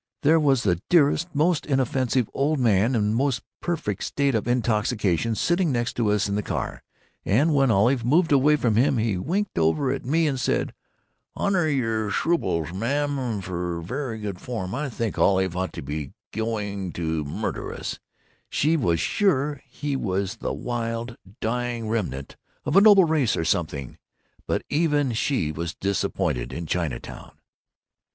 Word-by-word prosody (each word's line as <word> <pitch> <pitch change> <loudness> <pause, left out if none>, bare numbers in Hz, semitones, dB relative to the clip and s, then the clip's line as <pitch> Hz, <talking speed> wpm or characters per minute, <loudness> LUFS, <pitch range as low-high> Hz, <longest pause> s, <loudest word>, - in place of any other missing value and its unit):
There 160 +3 +5
was 135 -5 +3
the 90 -3 +1
dearest, 160 0 +4
most 155 +2 +2
inoffensive 130 -3 +1
old 150 +3 +1
man 115 +1 +3
in 105 -2 +1
the - - 0
most 135 0 0 0.2
perfect 160 - -2
state 140 -1 0
of 110 0 -1
intoxication 110 -3 +1
sitting 175 - +1
next 120 -1 -1
to 115 -3 +2
us 105 -1 +2
in 100 - -2
the 105 - 0
car, - - -4 0.4
and 145 +11 +3
when 135 -2 +3
Olive 115 +4 +3
moved 160 +7 +3
away 145 +2 +5
from 115 -7 +1
him 135 +2 +3
he 110 -3 +1
winked 185 - -1
over 85 - +2
at 135 - -3
me 160 +5 +2
and 135 -4 0
said, - - 0 0.6
'Honor 185 -5 +1
your 115 -7 0
shruples, 95 - 0
ma'am, 130 +1 -1
ver' 90 - -4
good 100 -4 -5
form.' 110 -6 -4
I 140 +2 -2
think 115 -3 -3
Olive 95 -2 +3
thought 95 +1 -3
he - - -5
was 75 +1 -4 0.3
going 105 -4 -3
to 80 -2 -2
murder 70 - -4
us—she 155 +3 -3
was 85 - +1
sure 145 - +1
he 145 -1 -4
was 100 -2 -2
the - - -3
wild, 115 0 -3 0.2
dying 120 0 -2
remnant 90 - -3 0.3
of 150 +2 -1
a 195 - +8
noble 200 -3 +8
race 155 -8 +1
or 80 - -1
something. 80 -7 -2 0.5
But - - 0
even 145 -4 +1
she 115 - 0
was 85 +3 -4
disappointed 95 -8 -1
in 85 - -4
Chinatown. 80 -5 -4
115 Hz, 160 wpm, -25 LUFS, 95-145 Hz, 0.6 s, a